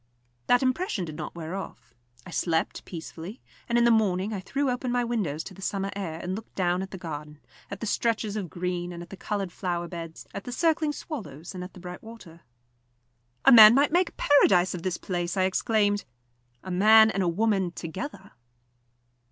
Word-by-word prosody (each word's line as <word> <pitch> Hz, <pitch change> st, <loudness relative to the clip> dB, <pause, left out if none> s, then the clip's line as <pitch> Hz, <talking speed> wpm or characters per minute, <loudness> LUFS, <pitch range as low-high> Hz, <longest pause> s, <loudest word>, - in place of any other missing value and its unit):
That 245 Hz, +2 st, +4 dB
impression 255 Hz, -, 0 dB
did 155 Hz, -2 st, -8 dB
not 150 Hz, +1 st, -6 dB
wear 165 Hz, 0 st, -6 dB
off. 125 Hz, -11 st, -8 dB, 0.3 s
I -, -, -10 dB
slept 165 Hz, -1 st, -1 dB
peacefully, 170 Hz, +5 st, -8 dB, 0.3 s
and 235 Hz, -, +2 dB
in 240 Hz, -, +4 dB
the 235 Hz, -, +5 dB
morning 205 Hz, -2 st, +2 dB
I 200 Hz, -, -3 dB
threw 275 Hz, +9 st, -2 dB
open 250 Hz, 0 st, -2 dB
my 245 Hz, 0 st, +1 dB
windows 200 Hz, -11 st, -2 dB
to 195 Hz, -, -9 dB
the 195 Hz, -, -13 dB
summer 195 Hz, 0 st, -2 dB
air, 170 Hz, -5 st, -4 dB
and 180 Hz, +2 st, -4 dB
looked 220 Hz, +2 st, -10 dB
down 180 Hz, -1 st, +1 dB
at 190 Hz, -, -5 dB
the 190 Hz, -, -7 dB
garden, 150 Hz, -3 st, -7 dB, 0.3 s
at 200 Hz, 0 st, -7 dB
the -, -, -2 dB
stretches 220 Hz, -1 st, 0 dB
of 195 Hz, -5 st, -3 dB
green 175 Hz, 0 st, -3 dB
and 175 Hz, 0 st, -7 dB
at 170 Hz, -, -15 dB
the -, -, -6 dB
coloured 195 Hz, -1 st, -3 dB
flower 175 Hz, -2 st, -3 dB
beds, 165 Hz, -2 st, -8 dB
at 200 Hz, -, -6 dB
the 245 Hz, -, -5 dB
circling 315 Hz, +2 st, +1 dB
swallows, 190 Hz, -, -7 dB
and 180 Hz, -1 st, -6 dB
at 180 Hz, -, -10 dB
the -, -, -11 dB
bright 180 Hz, 0 st, -8 dB
water. 220 Hz, -8 st, -13 dB, 1.0 s
"A -, -, +8 dB
man 220 Hz, -2 st, +10 dB
might 285 Hz, +2 st, +3 dB
make 350 Hz, +1 st, +3 dB
a -, -, -25 dB
paradise 185 Hz, -11 st, +4 dB
of 180 Hz, -, -5 dB
this 180 Hz, 0 st, -2 dB
place," 175 Hz, -1 st, -3 dB
I 190 Hz, -, +3 dB
exclaimed. 205 Hz, +1 st, +1 dB, 0.6 s
"A 185 Hz, -, -6 dB
man 220 Hz, +4 st, +7 dB
and 195 Hz, -, -1 dB
a 180 Hz, -, +1 dB
woman 195 Hz, 0 st, +1 dB
together!" 190 Hz, -, -7 dB
190 Hz, 200 wpm, -27 LUFS, 175-225 Hz, 1.0 s, man